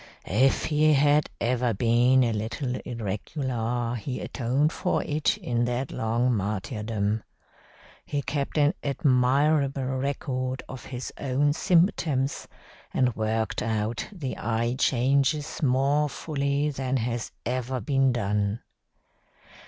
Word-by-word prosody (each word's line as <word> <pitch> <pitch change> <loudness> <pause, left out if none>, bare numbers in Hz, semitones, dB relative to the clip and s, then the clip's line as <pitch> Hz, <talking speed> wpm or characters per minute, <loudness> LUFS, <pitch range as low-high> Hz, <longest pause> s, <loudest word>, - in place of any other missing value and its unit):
If 130 +8 +2
he 155 0 +3
had 145 +1 +3
ever 120 -1 +1
been 120 +4 +4
a 115 -2 +1
little 115 +5 -3
irregular 120 - -3
he 125 +2 -4
atoned 135 +5 0
for 180 - 0
it 150 0 0
in 120 -1 -1
that 125 +2 -2
long 120 +3 +1
martyrdom. 105 +1 -2 0.8
He 145 -1 -3
kept 140 +2 -2
an 150 +2 +4
admirable 140 +1 +2
record 130 -1 -2
of 130 - -9
his 125 -1 -6
own 140 +2 +1
symptoms, 160 -6 +1 0.4
and 125 -3 +1
worked 110 0 -1
out 110 0 -1
the 155 -10 -5
eye 115 +1 0
changes 140 +4 +1
more 140 +2 +2
fully 140 0 -1
than 130 -1 -1
has 120 -2 -2
ever 125 +2 -2
been 135 +3 +2
done. 105 -2 -1
130 Hz, 115 wpm, -26 LUFS, 115-140 Hz, 0.8 s, been